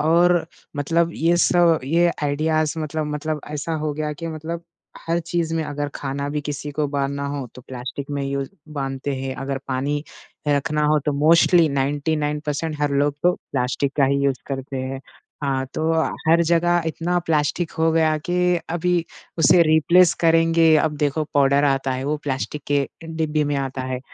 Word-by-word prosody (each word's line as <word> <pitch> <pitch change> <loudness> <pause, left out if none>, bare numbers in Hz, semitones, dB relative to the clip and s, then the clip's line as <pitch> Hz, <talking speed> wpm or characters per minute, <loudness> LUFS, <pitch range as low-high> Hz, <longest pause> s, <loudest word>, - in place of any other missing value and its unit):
और 170 +2 +3 0.3
मतलब 165 +4 +1
ये 170 +2 +2
सब 175 -2 +4
ये 170 +5 +3
आइडियाज़ 155 +2 0
मतलब 155 0 -3
मतलब 155 +1 -3
ऐसा 150 +2 -3
हो 155 -1 -1
गया 150 0 -3
कि 165 +3 -7
मतलब 165 +1 -5 0.4
हर 165 +1 +1
चीज़ 170 -1 -2
में 165 - 0
अगर 145 -1 -3
खाना 140 +1 -3
भी 150 +1 -2
किसी 145 0 -5
को 150 +1 0
बाँधना 140 0 -2
हो, 140 -2 -4
तो 125 - -12
प्लास्टिक 130 +3 -6
में 140 -1 -2
यूज़ 140 0 -2 0.2
बाँधते 135 -1 -3
हैं, 130 0 -4
अगर 135 0 -3
पानी 140 +3 -1 0.5
रखना 150 +1 +1
हो 150 0 +3
तो 150 - +2
मोस्टली 165 +3 +5
99 145 +2 -1
परसेंट 150 +1 -2
हर 145 -1 +1
लोग 145 0 +2
तो 180 - +4 0.2
प्लास्टिक 135 +1 0
का 140 - +4
ही 140 +1 +2
यूज 135 -2 +1
करते 135 0 -5
हैं। 130 +1 -4 0.4
हाँ, 135 -1 0
तो 160 +1 0 0.4
हर 170 +1 +5
जगह 170 +1 +2
इतना 170 +2 -1
प्लास्टिक 160 +2 0
हो 160 0 +3
गया 160 -1 +3
कि 180 +2 +1
अभी 175 +1 0 0.4
उसे 170 +2 +6
रिप्लेस 165 +2 +5
करेंगे। 165 -1 +4
अब 155 0 +1
देखो 145 +1 0
पाउडर 140 0 +4
आता 135 -1 +1
है, 130 +1 -3
वो 150 +2 0
प्लास्टिक 145 0 -4
के 140 -1 +1 0.2
डिब्बी 160 -2 -1
में 145 0 -1
आता 135 -1 -3
है, 130 0 -3
150 Hz, 175 wpm, -22 LUFS, 140-165 Hz, 0.5 s, उसे